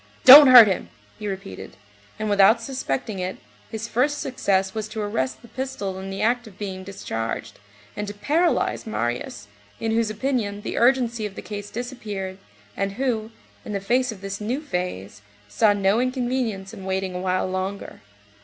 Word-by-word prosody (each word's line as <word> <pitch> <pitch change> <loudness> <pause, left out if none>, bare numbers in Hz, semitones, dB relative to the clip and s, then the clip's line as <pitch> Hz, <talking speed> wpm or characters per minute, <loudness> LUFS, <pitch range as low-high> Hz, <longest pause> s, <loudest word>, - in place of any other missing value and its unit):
"Don't 280 +3 +12
hurt 250 -3 +11
him!" 190 -3 -2 0.3
he 210 - -5
repeated, 190 - -7 0.4
and 215 0 -3
without 205 +2 +5
suspecting 225 - -4
it, 185 +1 -3 0.3
his 220 +1 -5
first 270 +6 +1
success 195 -8 0
was 215 -1 -4
to 215 +1 -7
arrest 130 -12 -2
the - - -13
pistol 245 -8 -5
in 190 0 -7
the 195 - -4
act 240 +1 +1
of 200 -3 -15
being 190 -2 -5
discharged, 115 -12 -5 0.4
and 210 0 -4
to 205 - -5
paralyze 315 +4 0
Marius, 120 - -3 0.3
in 225 - -1
whose 225 -1 +1
opinion 215 -3 -2
the - - -4
urgency 235 -3 +2
of 195 - -13
the - - -7
case 205 -1 -7
disappeared, 210 -6 -6 0.4
and 195 0 -2
who, 225 -2 -2 0.3
in 210 - -6
the 200 - -1
face 245 +5 +1
of 200 -4 -10
this 195 +1 -5
new 240 +6 -2
phase, 180 - -5 0.3
saw 210 - +3
no 200 +2 +2
inconvenience 245 -6 -2
in 195 -4 -9
waiting 190 0 -2
a 180 - -4
while 185 0 0
longer. 185 - -5
210 Hz, 170 wpm, -23 LUFS, 190-240 Hz, 0.4 s, Don't